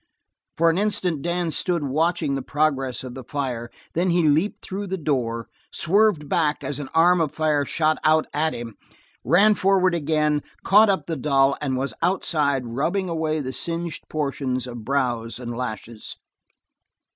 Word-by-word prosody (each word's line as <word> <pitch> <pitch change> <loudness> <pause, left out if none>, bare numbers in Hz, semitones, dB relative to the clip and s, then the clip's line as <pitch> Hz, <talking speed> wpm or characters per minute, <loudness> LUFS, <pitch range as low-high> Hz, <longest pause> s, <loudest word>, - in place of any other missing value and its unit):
For 165 +1 +4
an 170 - -1
instant 185 -7 0
Dan 175 0 -1
stood 170 +1 0
watching 155 +2 0
the 135 - -1
progress 135 -3 -1
of 125 -1 -7
the 130 0 -8
fire, 125 -3 -4 0.2
then 180 +3 +1
he 170 -2 +3
leaped 160 +8 +1
through 200 +2 -4
the 190 +1 -2
door, 120 -7 -1 0.2
swerved 195 -3 +2
back 150 0 +1
as 145 - -3
an 145 - -6
arm 175 +2 +5
of 155 -2 -1
fire 150 -2 +1
shot 155 +1 +1
out 155 0 +4
at 155 +2 0
him, 115 -2 -7 0.5
ran 195 - +5
forward 190 -2 +3
again, 150 -2 +1 0.2
caught 210 +2 +6
up 195 - +1
the 165 - -3
doll 135 -1 +2
and 135 -3 -1
was 130 -2 -2
outside 150 -7 +1
rubbing 165 +11 -1
away 160 -2 -1
the 130 -1 -5
singed 170 +2 -4
portions 140 -4 -2
of 120 -3 -8
brows 120 -3 -1
and 120 -1 -6
lashes. 115 -2 -5
150 Hz, 165 wpm, -23 LUFS, 130-170 Hz, 0.5 s, caught